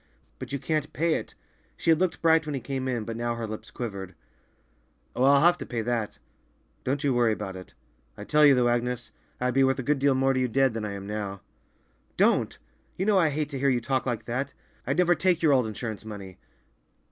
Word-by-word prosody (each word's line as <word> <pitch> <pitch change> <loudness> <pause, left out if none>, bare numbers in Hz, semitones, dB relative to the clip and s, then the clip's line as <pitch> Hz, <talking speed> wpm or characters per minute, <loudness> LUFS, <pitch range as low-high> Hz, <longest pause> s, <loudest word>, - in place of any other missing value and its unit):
"But 130 0 -7
you 140 - -1
can't 150 +1 -2
pay 165 +2 +1
it!" - - -4 0.4
She 165 - +2
had 160 - +4
looked 180 -3 -1
bright 160 -1 +4
when 150 - -2
he - - -2
came 130 +1 -4
in, 120 -4 -1
but 115 - -5
now 120 0 -2
her 115 -1 -4
lips 110 0 -7
quivered. 100 -6 -6 1.0
"Oh, 125 - +1
I'll 140 +1 +6
have 175 +2 +4
to - - -5
pay 120 -4 -3
that; 115 -2 -2 0.7
don't 140 +3 -1
you 140 -2 +2
worry 120 -2 +3
about 95 -3 -5
it. 95 0 -11 0.4
I 105 - -7
tell 150 +7 +3
you, 145 -2 +7
though, 125 -1 +3
Agnes, 120 -1 -1 0.3
I'd 125 0 0
be 135 +1 +4
worth 135 0 +2
a 130 - -3
good 145 +2 +1
deal 140 0 +3
more 135 +1 +2
to 130 - 0
you 130 - +1
dead 130 +1 +2
than 110 -1 -3
I 100 - -4
am 100 0 -7
now." 100 -2 -4 0.8
"Don't! - - +2 0.4
You 190 - -1
know 205 -2 +4
I 165 -3 +3
hate 150 +1 -2
to 140 -3 -5
hear 140 +1 +2
you 125 -2 +2
talk 130 +3 -1
like 115 -3 -2
that. 130 +4 -3 0.3
I'd 140 +4 0
never 180 -1 +4
take 175 +1 +1
your 150 -3 +5
old 125 -4 +3
insurance 110 0 -5
money." 100 -4 -9
130 Hz, 230 wpm, -27 LUFS, 115-145 Hz, 1.0 s, you